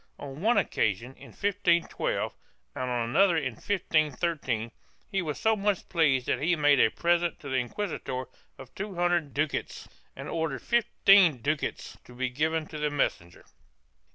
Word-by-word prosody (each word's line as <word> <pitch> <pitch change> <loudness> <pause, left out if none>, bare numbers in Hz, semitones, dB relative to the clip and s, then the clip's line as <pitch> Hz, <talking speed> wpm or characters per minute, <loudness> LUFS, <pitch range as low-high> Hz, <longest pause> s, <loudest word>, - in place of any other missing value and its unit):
On 140 +1 -8
one 230 +4 +3
occasion, 110 +5 0
in - - -14
1512, 190 -4 0 0.4
and 130 - -3
on 120 -2 -1
another 190 +2 +4
in 130 -6 -1
1513, 155 - -1 0.4
he 195 - 0
was 155 -4 -4
so 220 0 +3
much 200 -2 -1
pleased 145 -7 +2
that - - -1
he 170 +4 +2
made 145 -3 +4
a - - +5
present 175 +5 0
to 140 - -8
the 130 - 0
inquisitor 130 -1 -3 0.3
of - - -12
two 200 -1 -6
hundred 175 -4 +1
ducats 150 0 -2 0.3
and - - -8
ordered 160 -5 -3
fifteen 195 - +4
ducats 150 +1 -3
to 125 - -15
be 130 +1 -1
given 155 +5 -1
to 155 - -8
the 150 0 0
messenger. 85 -12 -2
155 Hz, 155 wpm, -28 LUFS, 130-175 Hz, 0.4 s, a